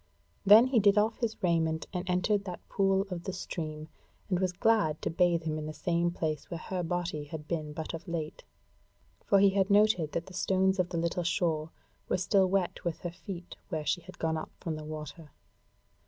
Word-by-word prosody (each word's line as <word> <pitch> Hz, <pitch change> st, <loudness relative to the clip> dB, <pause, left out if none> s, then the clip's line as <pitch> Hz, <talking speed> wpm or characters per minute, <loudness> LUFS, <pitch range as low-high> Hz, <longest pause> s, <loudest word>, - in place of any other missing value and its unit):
Then 210 Hz, +4 st, +9 dB
he 255 Hz, -2 st, +3 dB
did 200 Hz, 0 st, +4 dB
off 215 Hz, +2 st, +2 dB
his 230 Hz, -2 st, -1 dB
raiment 160 Hz, -2 st, +1 dB
and 180 Hz, 0 st, -3 dB
entered 195 Hz, +3 st, +1 dB
that 180 Hz, -2 st, -7 dB
pool 195 Hz, -1 st, +2 dB
of 175 Hz, -1 st, -5 dB
the 190 Hz, -, -3 dB
stream, 155 Hz, -4 st, -5 dB, 0.4 s
and 180 Hz, -, +2 dB
was 185 Hz, -1 st, +1 dB
glad 190 Hz, -5 st, +2 dB
to -, -, 0 dB
bathe 170 Hz, 0 st, +2 dB
him 155 Hz, -1 st, -2 dB
in 155 Hz, -, -5 dB
the 155 Hz, -, -5 dB
same 170 Hz, -1 st, +1 dB
place 155 Hz, -4 st, -3 dB
where 170 Hz, -, -4 dB
her 185 Hz, +2 st, -4 dB
body 175 Hz, -3 st, -2 dB
had 150 Hz, 0 st, -8 dB
been 155 Hz, -3 st, -3 dB
but 155 Hz, +2 st, -5 dB
of 165 Hz, +3 st, -7 dB
late; 160 Hz, -3 st, -4 dB, 0.8 s
for 200 Hz, -, +4 dB
he 195 Hz, 0 st, +6 dB
had 195 Hz, 0 st, +1 dB
noted 200 Hz, -6 st, +4 dB
that 170 Hz, -, -2 dB
the 190 Hz, -, -13 dB
stones 190 Hz, +1 st, +1 dB
of 180 Hz, -1 st, +1 dB
the 170 Hz, -, -3 dB
little 170 Hz, +1 st, 0 dB
shore 165 Hz, -2 st, 0 dB, 0.4 s
were -, -, +2 dB
still 190 Hz, +1 st, +3 dB
wet 190 Hz, -2 st, 0 dB
with 170 Hz, -2 st, -3 dB
her 175 Hz, -, -4 dB
feet 175 Hz, 0 st, -8 dB
where 155 Hz, -3 st, -3 dB
she 175 Hz, -, 0 dB
had 185 Hz, +1 st, -13 dB
gone 160 Hz, -1 st, 0 dB
up -, -, -5 dB
from 165 Hz, -2 st, -3 dB
the 155 Hz, 0 st, -7 dB
water. 155 Hz, 0 st, -7 dB
175 Hz, 210 wpm, -30 LUFS, 160-190 Hz, 0.8 s, Then